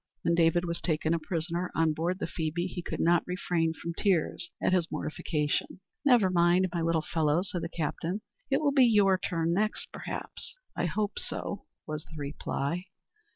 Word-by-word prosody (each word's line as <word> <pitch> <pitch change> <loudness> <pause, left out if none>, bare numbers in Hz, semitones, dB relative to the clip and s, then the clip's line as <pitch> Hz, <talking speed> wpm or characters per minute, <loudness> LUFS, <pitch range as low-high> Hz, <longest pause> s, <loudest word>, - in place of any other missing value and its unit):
When 170 - +3
David 170 +1 +3
was 170 0 -3
taken 160 -1 +1
a 170 - +1
prisoner 170 +2 -2
on 160 -1 +3
board 170 +4 -1
the - - -2
Phoebe, 165 +1 -2
he 180 -1 -4
could - - -5
not 170 0 +4
refrain 175 -2 0
from 170 +1 -5
tears 195 - +1
at - - +2
his 180 -2 +2
mortification. 155 +1 -2 0.2
"Never 240 -10 +5
mind, 175 +1 +4
my 170 - 0
little 165 -1 +1
fellow," 155 +1 +1
said 180 -3 -3
the 165 - -3
captain; 170 +4 -2 0.3
"it 275 +2 +2
will 290 -2 +3
be 270 -2 +6
your 205 -5 +5
turn 165 -3 0
next, 215 +4 -1
perhaps." - - -7 0.2
"I - - 0
hope 205 +4 -1
so," 200 - -4 0.2
was 155 0 -4
the 160 - -12
reply. 145 +3 -3
170 Hz, 180 wpm, -29 LUFS, 160-185 Hz, 0.3 s, be